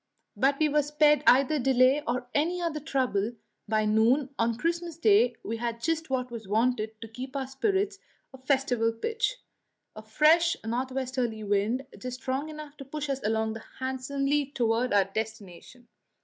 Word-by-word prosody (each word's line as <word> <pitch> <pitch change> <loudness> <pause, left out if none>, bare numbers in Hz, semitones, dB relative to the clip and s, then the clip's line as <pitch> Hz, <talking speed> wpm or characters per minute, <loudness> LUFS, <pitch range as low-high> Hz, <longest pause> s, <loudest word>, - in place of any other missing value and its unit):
But 275 +1 +2
we 310 - +4
were 300 0 +3
spared 295 0 +3
either 275 +4 +5
delay 260 +2 +4
or 250 +1 -1
any 335 +5 +1
other 335 -3 -2
trouble; 255 -7 -1 0.3
by 215 0 +1
noon 240 +6 +2
on 230 0 +1
Christmas 335 +2 -2
Day 425 +7 +4
we 225 - -3
had 235 0 -3
just 320 +4 -1
what 255 -2 -2
was 225 -4 -7
wanted 220 0 0
to 225 - -6
keep 255 +4 -8
our 270 -1 -1
spirits 390 +9 -1 0.3
at 260 0 -15
festival 250 -5 +2
pitch; 455 - -1 0.6
a 215 - -8
fresh 310 +10 +3
north 250 +4 -2
westerly 255 -4 -2
wind, 210 +6 0
just 250 0 -6
strong 270 +4 -2
enough 300 -1 -9
to 275 - -8
push 295 +1 -5
us 270 - -2
along 220 +1 0 0.2
handsomely 275 +2 -1
toward 240 -2 0
our 200 -2 +4
destination. 220 +2 -7
260 Hz, 165 wpm, -28 LUFS, 225-295 Hz, 0.6 s, either